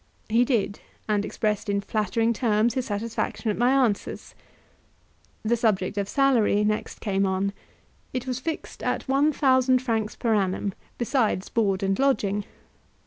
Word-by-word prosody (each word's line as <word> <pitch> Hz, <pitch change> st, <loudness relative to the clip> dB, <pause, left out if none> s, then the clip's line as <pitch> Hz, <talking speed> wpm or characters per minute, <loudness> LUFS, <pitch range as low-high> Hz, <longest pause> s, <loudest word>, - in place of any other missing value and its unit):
He 230 Hz, +3 st, +4 dB
did, 230 Hz, -5 st, 0 dB, 0.3 s
and 210 Hz, -1 st, +1 dB
expressed 210 Hz, -1 st, -2 dB
in 200 Hz, 0 st, +1 dB
flattering 215 Hz, +3 st, 0 dB
terms 220 Hz, 0 st, +2 dB
his 255 Hz, 0 st, -2 dB
satisfaction 220 Hz, +1 st, -2 dB
at -, -, -2 dB
my 245 Hz, +1 st, +4 dB
answers. 255 Hz, -6 st, 0 dB, 1.1 s
The 225 Hz, +2 st, +2 dB
subject 210 Hz, -5 st, 0 dB
of 200 Hz, -1 st, -2 dB
salary 245 Hz, -7 st, +3 dB
next 215 Hz, 0 st, -2 dB
came 195 Hz, -2 st, 0 dB
on; 190 Hz, +1 st, 0 dB, 0.6 s
it 255 Hz, -1 st, -3 dB
was 255 Hz, -1 st, -2 dB
fixed 320 Hz, +4 st, -5 dB
at -, -, -2 dB
one 275 Hz, +3 st, +3 dB
thousand 260 Hz, -3 st, +3 dB
francs 225 Hz, -4 st, -1 dB
per 230 Hz, -3 st, 0 dB
annum, 195 Hz, -1 st, 0 dB, 0.2 s
besides 235 Hz, -6 st, 0 dB
board 200 Hz, -4 st, +1 dB
and 195 Hz, 0 st, 0 dB
lodging. 210 Hz, -7 st, +1 dB
220 Hz, 145 wpm, -25 LUFS, 205-250 Hz, 1.1 s, He